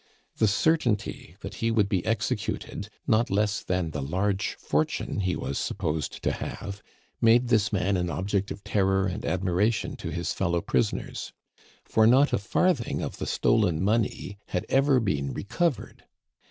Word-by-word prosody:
The 110 - +4
certainty 110 -2 0
that - - -6
he 115 - +2
would 110 -3 +3
be 95 -3 0
executed, 115 -1 -2 0.2
not 110 +2 +2
less 105 +1 +1
than 90 -3 -1
the 75 - -3
large 95 +7 -1
fortune 75 +6 -1
he 95 -3 0
was 70 - -3
supposed 75 0 -3
to - - +2
have, 100 0 -6 0.4
made 120 +2 +5
this 110 -4 +3
man 95 -1 +1
an 90 -1 -1
object 95 +5 -1
of 100 - -7
terror 95 -1 +2
and 95 +1 -3
admiration 95 +4 0
to - - -5
his 85 0 -2
fellow 85 -2 0
prisoners; 110 +4 -1 0.5
for 110 0 +4
not 135 +5 +5
a - - +3
farthing 135 - +1
of - - -5
the - - -4
stolen 100 -8 +2
money 105 -1 0
had 90 - -2
ever 135 -1 +4
been 70 - -1
recovered. 160 - -2
100 Hz, 155 wpm, -27 LUFS, 90-115 Hz, 0.5 s, made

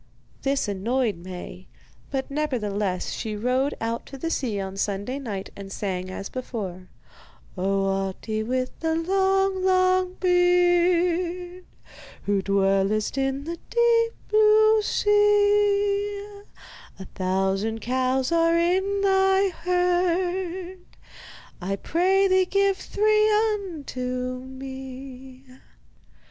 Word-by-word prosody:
This 275 -3 0
annoyed 215 +2 -1
Maie, 180 +1 -9 0.4
but 270 0 -3
nevertheless 210 -10 -2
she 215 -1 -4
rowed 255 +6 0
out 230 +1 -3
to 285 +5 -5
sea 230 -10 -1
on 190 0 -5
Sunday 205 +7 -2
night 205 -8 -6
and 195 -1 -9
sang 185 -2 -3
as 195 +1 -6
before: 195 -8 -6 0.7
Oh, 195 +1 0
Ahti, 195 +3 -2
with 255 +3 -2
the 320 -1 0
long, 385 +2 +1
long 370 0 +2
beard, 355 0 +2 0.6
Who 200 -1 +1
dwellest 195 +2 +1
in 270 0 -1
the 335 +2 -6
deep 470 -1 +3
blue 435 0 +5
sea, 410 -1 +2 0.7
A 190 - -9
thousand 195 +4 -1
cows 255 +2 0
are 335 0 +3
in 380 +4 +1
thy 385 0 +3
herd, 360 +1 -1 0.8
I 195 +2 -2
pray 375 - +2
thee 375 0 +3
give 395 0 +1
three 425 +1 +2 0.2
unto 255 -10 -4
me. 265 0 -9
285 Hz, 105 wpm, -24 LUFS, -, 0.8 s, blue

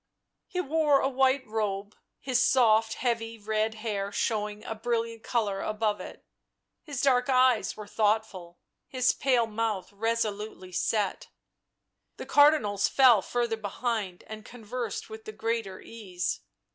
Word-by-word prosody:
He 360 - -4
wore 300 -3 +3
a - - +1
white 265 0 +2
robe, 210 -2 -3 0.2
his 255 -2 +1
soft 225 -3 +4
heavy 230 -2 -2
red 215 +1 -1
hair 205 -3 -3
showing 210 -1 -2
a - - -3
brilliant 230 0 -2
colour 210 -5 -1
above 215 -1 -1
it; - - -10 0.6
his 285 -5 -5
dark 255 -2 +3
eyes 255 -6 +3
were 210 - -7
thoughtful, 205 -5 -1 0.3
his 255 -1 +2
pale 250 -4 +2
mouth 215 -3 -3
resolutely 210 -3 -2
set. 205 +2 -1 0.9
The - - -7
Cardinals 285 -10 +4
fell 250 -6 +6
further 235 0 -1
behind 210 -3 -3
and 215 0 -9
conversed 245 +2 -5
with 440 0 -10
the 435 - -6
greater 225 - -3
ease. 190 -6 -4
225 Hz, 135 wpm, -28 LUFS, 210-250 Hz, 0.9 s, fell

